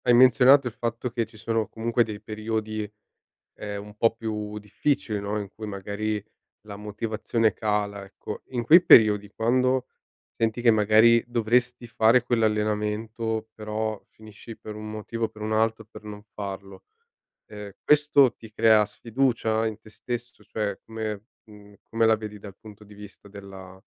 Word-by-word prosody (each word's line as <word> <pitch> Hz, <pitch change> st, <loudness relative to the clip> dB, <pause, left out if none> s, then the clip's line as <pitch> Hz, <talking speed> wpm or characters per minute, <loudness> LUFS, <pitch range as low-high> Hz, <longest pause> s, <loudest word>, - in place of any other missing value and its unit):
hai 120 Hz, -1 st, +3 dB
menzionato 130 Hz, +2 st, +6 dB
il 120 Hz, -, -2 dB
fatto 115 Hz, +1 st, -4 dB
che 115 Hz, -1 st, -2 dB
ci 110 Hz, -, -19 dB
sono 115 Hz, 0 st, -2 dB
comunque 115 Hz, +1 st, 0 dB
dei 105 Hz, -1 st, -8 dB
periodi 110 Hz, -1 st, -4 dB, 0.7 s
ehm, 100 Hz, -1 st, -6 dB
un 105 Hz, 0 st, -13 dB
po' 115 Hz, -, +3 dB
più 105 Hz, -2 st, -5 dB
difficili, 105 Hz, +1 st, -2 dB
no, 100 Hz, +1 st, -3 dB
in 100 Hz, -2 st, -6 dB
cui 110 Hz, +1 st, -9 dB
magari 105 Hz, +1 st, -4 dB, 0.4 s
la 100 Hz, -, -7 dB
motivazione 110 Hz, +2 st, -1 dB
cala, 105 Hz, -2 st, -2 dB
ecco. -, -, -9 dB
In 120 Hz, -2 st, -3 dB
quei 165 Hz, +9 st, +8 dB
periodi 105 Hz, -2 st, +6 dB
quando 130 Hz, +2 st, +1 dB, 0.5 s
senti 115 Hz, +1 st, 0 dB
che 120 Hz, -, +4 dB
magari 110 Hz, +2 st, +5 dB
dovresti 120 Hz, +1 st, 0 dB
fare 115 Hz, +2 st, +4 dB
quell'allenamento 110 Hz, 0 st, -1 dB
però 110 Hz, 0 st, -3 dB
finisci 110 Hz, +1 st, -13 dB
per 105 Hz, -, -9 dB
un 110 Hz, 0 st, -7 dB
motivo 115 Hz, +2 st, -5 dB
o 110 Hz, -, -5 dB
per 110 Hz, -1 st, -14 dB
un 110 Hz, 0 st, -2 dB
altro 110 Hz, 0 st, +1 dB
per 105 Hz, 0 st, -14 dB
non 105 Hz, -1 st, -9 dB
farlo, 100 Hz, -1 st, -7 dB, 0.6 s
ehm, 105 Hz, -2 st, -9 dB
questo 150 Hz, -3 st, +4 dB
ti 110 Hz, -1 st, -14 dB
crea 110 Hz, -1 st, +5 dB
sfiducia 115 Hz, 0 st, -1 dB
in 110 Hz, -2 st, -3 dB
te 110 Hz, -, -16 dB
stesso? 120 Hz, +2 st, -7 dB
Cioè 105 Hz, -3 st, -3 dB
come 110 Hz, -2 st, -5 dB, 0.2 s
mhmm, 105 Hz, -1 st, -16 dB
come 115 Hz, 0 st, 0 dB
la 110 Hz, -, +5 dB
vedi 105 Hz, -1 st, -7 dB
dal 100 Hz, -1 st, -11 dB
punto 105 Hz, -1 st, -14 dB
di 105 Hz, -, -15 dB
vista 105 Hz, 0 st, -13 dB
della 95 Hz, -2 st, -11 dB
110 Hz, 160 wpm, -25 LUFS, 105-115 Hz, 0.7 s, quei